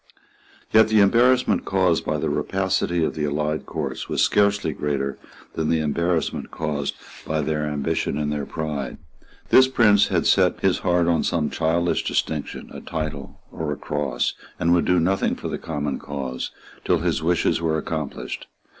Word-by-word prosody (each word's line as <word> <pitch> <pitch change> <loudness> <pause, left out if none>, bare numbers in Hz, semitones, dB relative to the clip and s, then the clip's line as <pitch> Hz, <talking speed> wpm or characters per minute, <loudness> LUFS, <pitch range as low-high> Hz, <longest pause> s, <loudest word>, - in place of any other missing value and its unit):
Yet 110 0 +7
the 110 -1 +3
embarrassment 120 +5 +4
caused 95 -4 +1
by - - 0
the - - -1
rapacity 95 -3 0
of - - 0
the 75 - -2
allied 75 +1 -2
courts 70 -5 -4
was - - -2
scarcely 100 -5 +2
greater 70 -2 -2 0.3
than 80 -1 -1
the 80 - +2
embarrassment 85 +2 -1
caused 75 -3 -3 0.3
by 80 0 -1
their 75 0 -1
ambition 70 -1 -1
and 75 -1 -1
their 75 -1 -3
pride. 75 -5 -4 0.5
This 130 0 +7
prince 105 -6 +4
had - - 0
set - - +3
his - - +2
heart 90 -2 +2
on 85 -2 +3
some 80 -3 0
childish 85 +2 +1
distinction, 75 -2 -2
a - - -8
title 75 -3 -5
or 80 -2 -3
a 75 - -3
cross, 70 -4 -1 0.3
and 85 +1 +3
would 85 - +3
do 90 -1 +3
nothing 95 +4 +1
for - - -6
the - - -4
common 75 -3 -3
cause 65 -3 -4 0.3
till - - +2
his - - 0
wishes 85 +1 +1
were 80 -1 +1
accomplished. 80 -2 -4
80 Hz, 165 wpm, -23 LUFS, 75-90 Hz, 0.5 s, Yet